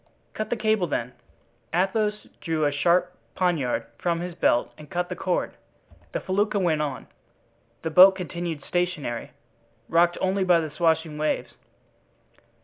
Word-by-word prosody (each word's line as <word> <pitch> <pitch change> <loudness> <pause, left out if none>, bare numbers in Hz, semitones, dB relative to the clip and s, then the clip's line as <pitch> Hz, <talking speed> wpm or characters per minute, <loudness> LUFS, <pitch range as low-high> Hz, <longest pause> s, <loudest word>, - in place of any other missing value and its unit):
"Cut 215 - -4
the - - 0
cable, 215 -4 +1
then." 125 -4 -3 0.6
Athos 210 +4 0
drew 160 -3 -1
a 145 - +2
sharp 175 +5 +2 0.2
poniard 145 -11 0
from 170 -1 0
his 175 0 -5
belt 120 -7 +1
and 150 -1 -13
cut 175 0 -2
the 180 - -4
cord. 180 0 -1 0.6
The - - -2
felucca 205 +2 0
went 170 -5 +1
on, 145 -3 -3 0.8
the 160 - -2
boat 185 +4 +8
continued 170 -4 -5
stationary, 175 -9 -2 0.6
rocked 175 +1 +3
only 190 +1 +1
by 180 -2 +4
the 155 -2 -4
swashing 160 -1 0
waves. 155 - -1
175 Hz, 140 wpm, -25 LUFS, 155-185 Hz, 0.8 s, boat